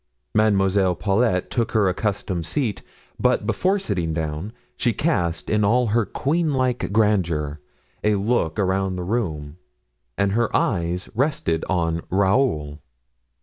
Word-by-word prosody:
Mademoiselle 95 Hz, -3 st, +3 dB
Paulet 100 Hz, 0 st, +1 dB
took 115 Hz, -2 st, -1 dB
her 105 Hz, -4 st, +3 dB
accustomed 95 Hz, -2 st, -1 dB
seat, 125 Hz, -8 st, -1 dB, 0.4 s
but -, -, +2 dB
before 190 Hz, +2 st, +1 dB
sitting 90 Hz, -, -2 dB
down, 80 Hz, +5 st, -3 dB, 0.2 s
she 120 Hz, -, +1 dB
cast, 90 Hz, -, 0 dB
in 105 Hz, 0 st, +1 dB
all 120 Hz, +3 st, +3 dB
her 115 Hz, -3 st, +2 dB
queen 155 Hz, -, 0 dB
like 125 Hz, -5 st, 0 dB
grandeur, 85 Hz, -9 st, +1 dB, 0.4 s
a 105 Hz, 0 st, +3 dB
look 100 Hz, -6 st, 0 dB
around 95 Hz, -1 st, 0 dB
the 90 Hz, -, -4 dB
room, 85 Hz, -8 st, -3 dB, 0.6 s
and 100 Hz, -1 st, +1 dB
her 115 Hz, +3 st, +1 dB
eyes 90 Hz, -1 st, -1 dB
rested 125 Hz, -, 0 dB
on 85 Hz, -2 st, 0 dB
Raoul. 95 Hz, -, +1 dB
100 Hz, 130 wpm, -23 LUFS, 85-115 Hz, 0.6 s, Mademoiselle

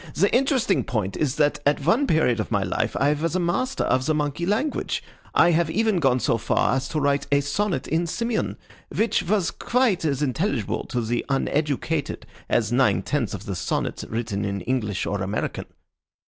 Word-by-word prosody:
The 200 Hz, +6 st, +2 dB
interesting 260 Hz, -6 st, +2 dB
point 100 Hz, -5 st, -2 dB
is 145 Hz, -3 st, 0 dB
that 150 Hz, -2 st, +2 dB
at 145 Hz, -1 st, +1 dB
one 245 Hz, -, +3 dB
period 125 Hz, -, +2 dB
of 105 Hz, -, -2 dB
my -, -, +1 dB
life -, -, -1 dB
I 145 Hz, +2 st, +3 dB
was 165 Hz, +3 st, -2 dB
a -, -, +2 dB
master 240 Hz, +10 st, 0 dB
of 130 Hz, 0 st, +1 dB
the 155 Hz, -, +2 dB
monkey 150 Hz, +3 st, -1 dB
language. 260 Hz, +9 st, -1 dB, 0.3 s
I 175 Hz, -, +6 dB
have 170 Hz, -1 st, +2 dB
even 220 Hz, +3 st, +1 dB
gone 135 Hz, -4 st, +3 dB
so 115 Hz, -, +1 dB
far 115 Hz, +3 st, +1 dB
as 135 Hz, 0 st, -1 dB
to 155 Hz, -, -1 dB
write 140 Hz, -1 st, +1 dB
a 140 Hz, -, +5 dB
sonnet 170 Hz, +8 st, -1 dB
in 165 Hz, +2 st, 0 dB
Simian, 230 Hz, +6 st, -2 dB, 0.3 s
which 225 Hz, -3 st, +1 dB
was 185 Hz, 0 st, 0 dB
quite 235 Hz, -8 st, +1 dB
as 145 Hz, -2 st, 0 dB
intelligible 135 Hz, -, -1 dB
to 125 Hz, -, -1 dB
the 120 Hz, +1 st, -1 dB
uneducated 145 Hz, +2 st, -1 dB, 0.2 s
as 115 Hz, -1 st, +1 dB
nine 125 Hz, +1 st, +3 dB
tenths 130 Hz, -9 st, -1 dB
of 100 Hz, +1 st, -9 dB
the 100 Hz, -, -3 dB
sonnets 90 Hz, -, -2 dB
written 110 Hz, -3 st, -3 dB
in 100 Hz, -1 st, -2 dB
English 105 Hz, -3 st, -1 dB
or 100 Hz, -1 st, -2 dB
American." 95 Hz, +2 st, -3 dB
145 Hz, 185 wpm, -24 LUFS, 120-175 Hz, 0.3 s, I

